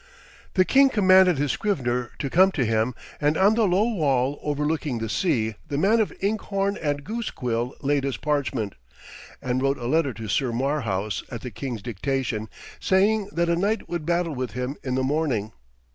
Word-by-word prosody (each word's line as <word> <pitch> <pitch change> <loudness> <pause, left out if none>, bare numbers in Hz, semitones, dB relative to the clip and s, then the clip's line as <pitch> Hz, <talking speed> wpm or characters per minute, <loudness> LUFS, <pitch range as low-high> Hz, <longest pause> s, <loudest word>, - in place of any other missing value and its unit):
The 185 -2 +5
king 275 +4 +5
commanded 185 - +5
his 145 -1 +1
scrivener 125 - -1
to 140 - -3
come 190 +3 +5
to 125 - 0
him, 115 +2 0 0.3
and 150 +1 +2
on 195 +3 +5
the 220 -2 +2
low 185 +3 +3
wall 145 - +1
overlooking 150 -2 -1
the 115 0 -3
sea 110 - 0
the 140 - -3
man 205 +8 +3
of 220 - +1
inkhorn 200 -1 0
and 145 -2 -2
goosequill 125 - -3
laid 140 0 +1
his 135 -2 -2
parchment, 135 -7 -1 0.7
and 125 0 0
wrote 135 +1 +1
a 120 - -7
letter 140 -1 +1
to 110 +1 -7
Sir 120 +5 0
Marhaus 115 -6 -1
at 115 -4 -6
the 125 - -6
king's 120 -1 -5
dictation, 120 -1 -2 0.3
saying 200 +2 +2
that 170 -2 0
a 170 - +2
knight 200 +5 0
would 175 -2 -3
battle 170 -2 +1
with 125 -4 -4
him 125 +3 -3
in 130 -2 -2
the 130 - 0
morning. 130 -7 0
145 Hz, 180 wpm, -24 LUFS, 125-185 Hz, 0.7 s, The